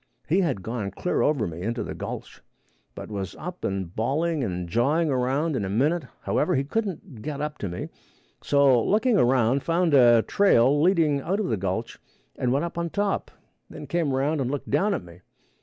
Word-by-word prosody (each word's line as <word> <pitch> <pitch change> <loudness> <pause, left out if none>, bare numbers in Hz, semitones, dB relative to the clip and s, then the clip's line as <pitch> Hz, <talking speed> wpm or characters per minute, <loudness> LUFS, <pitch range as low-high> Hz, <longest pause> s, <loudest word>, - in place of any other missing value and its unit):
He 175 +6 +3
had 135 - -1
gone 110 -2 -3
clear 140 - -1
over 145 -7 +2
me 85 -1 -6
into 115 +5 -2
the - - -5
gulch, - - -7 0.5
but - - -8
was 100 -2 -4
up 180 +2 -8
and 95 -3 -3
bawling 145 +6 0
and 90 -5 -3
jawing 145 - +1
around 135 +5 0
in 110 - -1
a 95 - -3
minute. 150 - +1 0.2
However, 180 - +1
he 135 - +1
couldn't 185 - -4
get 145 +3 -5
up 150 0 -4
to 100 - -3
me, 85 - -5 0.5
so 140 -5 +4
looked 215 +5 +1
around, 130 - +3
found 165 0 +1
a 120 -4 +6
trail 145 -8 +3
leading 160 -5 +3
out 190 +8 -1
of 210 - -1
the 115 - +1
gulch, 95 0 -3 0.4
and 125 - -1
went 140 +5 +1
up 170 0 -5
on 170 0 -2
top, 200 +2 -1 0.4
then - - -9
come 170 -4 0
around 140 +3 0
and 125 - -1
looked 140 0 -4
down 200 +1 +2
at - - -5
me. 85 +1 -15
140 Hz, 195 wpm, -25 LUFS, 115-170 Hz, 0.5 s, a